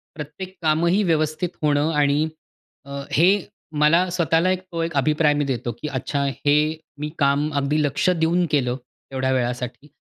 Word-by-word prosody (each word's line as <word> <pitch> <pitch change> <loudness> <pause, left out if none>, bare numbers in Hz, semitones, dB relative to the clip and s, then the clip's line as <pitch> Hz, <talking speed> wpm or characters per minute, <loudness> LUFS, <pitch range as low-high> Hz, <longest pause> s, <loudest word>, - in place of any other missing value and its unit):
प्रत्येक 165 +5 -8
कामही 170 +5 +2
व्यवस्थित 160 0 0
होणं 150 +1 +2
आणि 145 +1 +2 0.6
अ, 140 0 -6
हे 170 +5 +5 0.5
मला 170 +5 +4
स्वतःला 170 0 +2
एक 185 - 0
तो 165 - -2
एक 165 - -3
अभिप्राय 150 +2 +3
मी 145 -1 0
देतो, 120 -3 -2
की 150 - -3
अच्छा 140 +1 -2 0.2
हे 145 - +5 0.4
मी 150 0 -3
काम 140 +1 +2
अगदी 145 +2 +1
लक्ष 145 +5 +1
देऊन 175 +1 +2
केलं 125 -5 +1 0.4
तेवढ्या 130 0 0
वेळासाठी 125 +1 -2
150 Hz, 155 wpm, -22 LUFS, 140-165 Hz, 0.6 s, हे